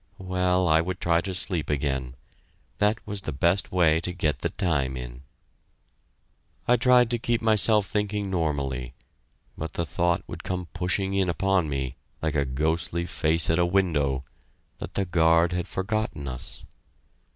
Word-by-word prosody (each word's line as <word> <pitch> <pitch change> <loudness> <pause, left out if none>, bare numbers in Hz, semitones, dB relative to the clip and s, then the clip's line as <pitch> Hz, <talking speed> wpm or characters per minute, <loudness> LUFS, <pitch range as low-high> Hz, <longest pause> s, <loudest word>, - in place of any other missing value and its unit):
Well, 90 -1 +1
I 80 0 +4
would 95 +2 -4
try 85 0 +2
to 95 -1 -5
sleep 90 -3 -2
again; 65 -3 -1 0.6
that 105 +1 +3
was 105 -1 -3
the 75 - -4
best 85 +8 +1
way 80 -3 +4
to 90 - -3
get 80 -4 -1
the - - -1
time 70 -7 -1
in. 60 0 -8 1.5
I 125 - +6
tried 125 -1 +4
to 120 - +1
keep 120 0 0
myself 110 -1 +5
thinking 105 0 -2
normally, 70 -7 -2 0.6
but 80 +1 -6
the 85 - -2
thought 85 +3 0
would - - -8
come 90 -1 -3
pushing 95 +2 0
in 95 -2 +1
upon 90 -2 +1
me, 70 -3 -3 0.2
like 80 -1 -1
a 70 -2 +1
ghostly 80 +5 -1
face 80 -2 0
at 80 - +2
a 85 - +4
window, 75 -8 +1 0.6
that - - -7
the 100 - 0
guard 85 0 +3
had 90 0 -2
forgotten 100 -7 -2
us. 65 -1 -7
85 Hz, 160 wpm, -26 LUFS, 75-95 Hz, 1.5 s, I